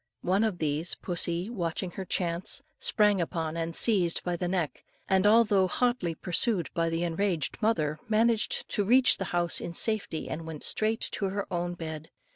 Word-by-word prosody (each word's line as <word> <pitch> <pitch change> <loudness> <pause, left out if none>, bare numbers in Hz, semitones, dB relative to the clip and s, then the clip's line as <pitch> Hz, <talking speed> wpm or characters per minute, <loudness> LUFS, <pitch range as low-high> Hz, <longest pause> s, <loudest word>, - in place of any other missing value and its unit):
One 190 +4 +2
of 215 -5 0
these 155 +2 -1
pussy, 175 0 -1
watching 180 -4 -3
her 190 +2 -6
chance, 175 +8 -1 0.2
sprang 210 -3 +3
upon 165 -2 -3
and 165 0 -3
seized 185 -7 +4
by 175 -1 -1
the 175 +1 -3
neck, 175 -4 -2 0.2
and 190 +1 +3
although 210 -3 +4
hotly 240 -5 0
pursued 180 - -1
by 165 -1 0
the 165 +1 -1
enraged 170 -2 -1
mother, 155 -9 0
managed 225 0 +2
to 205 - 0
reach 250 +5 +4
the 190 - -2
house 175 -1 0
in 170 - -6
safety, 215 -7 -1
and 160 +1 -5
went 155 -2 -7
straight 220 +1 +1
to 200 - -2
her 195 +1 -2
own 175 0 -2
bed. 160 -2 -7
180 Hz, 175 wpm, -28 LUFS, 165-210 Hz, 0.2 s, seized